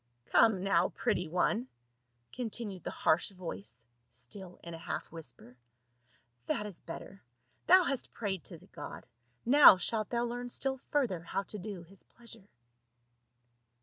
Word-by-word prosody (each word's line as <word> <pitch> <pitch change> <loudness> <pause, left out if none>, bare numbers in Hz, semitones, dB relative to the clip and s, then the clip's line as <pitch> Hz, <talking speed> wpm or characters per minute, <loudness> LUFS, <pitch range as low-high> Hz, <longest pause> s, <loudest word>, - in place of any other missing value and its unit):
" 120 - -45
Come 210 -5 +5
now, 185 -3 +3
pretty 180 - 0
one," 200 +8 +1 0.7
continued 220 -6 -4
the - - -3
harsh 160 - +2
voice 120 - -8 0.2
still 150 - -10
in 170 - -7
a - - -5
half - - -4
whisper, 125 -6 -7 0.4
" 120 0 -39
that 210 - 0
is 200 -5 -8
better, 190 +3 -9 0.5
thou 370 +1 +8
hast 275 -5 -2
prayed 195 -6 -3
to - - -8
the - - -18
god; - - -8 0.4
now 275 -6 +9
shalt 215 +3 -1
thou 240 -1 0
learn 245 +1 -4
still 265 +2 0
further 250 - 0
how 190 +4 -2
to 210 +1 -7
do 190 -2 -6
his 190 +3 -10
pleasure." 230 -4 -11
195 Hz, 150 wpm, -32 LUFS, 165-230 Hz, 0.7 s, now